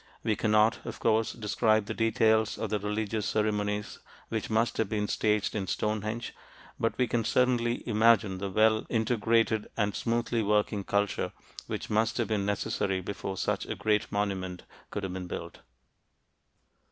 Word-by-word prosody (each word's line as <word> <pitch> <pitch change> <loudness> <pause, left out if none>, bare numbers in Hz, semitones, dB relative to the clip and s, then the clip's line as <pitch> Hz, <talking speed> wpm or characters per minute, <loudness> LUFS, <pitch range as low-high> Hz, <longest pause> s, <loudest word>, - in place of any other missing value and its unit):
We 110 -2 +1
cannot, 110 +2 +3
of - - -7
course, 110 0 +2
describe 110 -1 +1
the - - -4
details 110 -1 +2
of 110 - -3
the 105 - +1
religious 105 +1 -2
ceremonies 105 -1 -1 0.3
which 110 -2 -3
must 110 +1 +1
have 110 -3 0
been 105 -1 -1
staged 105 -1 +1
in 100 -3 -2
Stonehenge, 110 +2 -2 0.5
but 115 - 0
we 125 - +3
can 120 -1 0
certainly 120 0 +1
imagine 110 -4 +3
the 100 0 -3
well 110 +2 +3
integrated 115 -1 +1
and 105 -2 +1
smoothly 115 0 0
working 105 -1 +1
culture 100 0 0 0.3
which - - -5
must 110 +2 +1
have - - 0
been 100 -2 0
necessary 95 -1 -1
before 95 0 -5
such - - -1
a - - -3
great 105 -1 0
monument 95 -3 -2 0.3
could 100 - -4
have 95 -1 -3
been 95 -1 -5
built. - - -6
110 Hz, 155 wpm, -29 LUFS, 105-115 Hz, 0.5 s, cannot